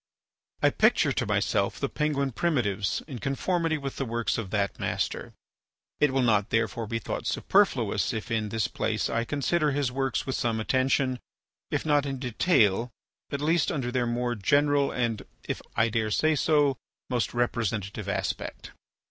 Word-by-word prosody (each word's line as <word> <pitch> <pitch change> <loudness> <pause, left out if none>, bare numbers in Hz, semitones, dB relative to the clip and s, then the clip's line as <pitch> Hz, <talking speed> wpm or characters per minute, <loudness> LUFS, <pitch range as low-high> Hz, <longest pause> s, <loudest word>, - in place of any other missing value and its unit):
I - - +5
picture - - +3
to - - -1
myself - - 0
the - - 0
Penguin 145 -3 -1
primitives 110 - 0
in 130 -6 -6
conformity 160 +4 0
with 140 -2 -5
the - - -1
works 115 0 -1
of 105 -5 -5
that 100 -1 -1
master. - - -2 0.6
It 150 -2 +4
will 135 -1 +2
not 105 -4 +2
therefore 115 0 0
be 115 - -1
thought 115 - -4
superfluous - - +2
if 110 +2 -5
in 110 -2 0
this 115 0 0
place 110 -1 -1
I 115 0 0
consider 150 +2 +1
his 140 -3 0
works 135 +1 -1
with 130 - -2
some 115 -2 0
attention, 130 +2 +1 0.5
if - - -1
not 145 -2 +2
in 135 -1 -3
detail, 120 - +2 0.4
at 140 - -2
least 160 +2 +2
under 125 -4 -2
their 125 -1 0
more 120 +1 -1
general 145 +5 +2
and, 115 -3 -1 0.3
if - - -3
I 115 - +3
dare 110 -1 0
say 155 +8 +2
so, 145 -3 +3 0.3
most 125 -2 -1
representative 110 -4 -1
aspect. - - -3
125 Hz, 165 wpm, -27 LUFS, 115-145 Hz, 0.6 s, I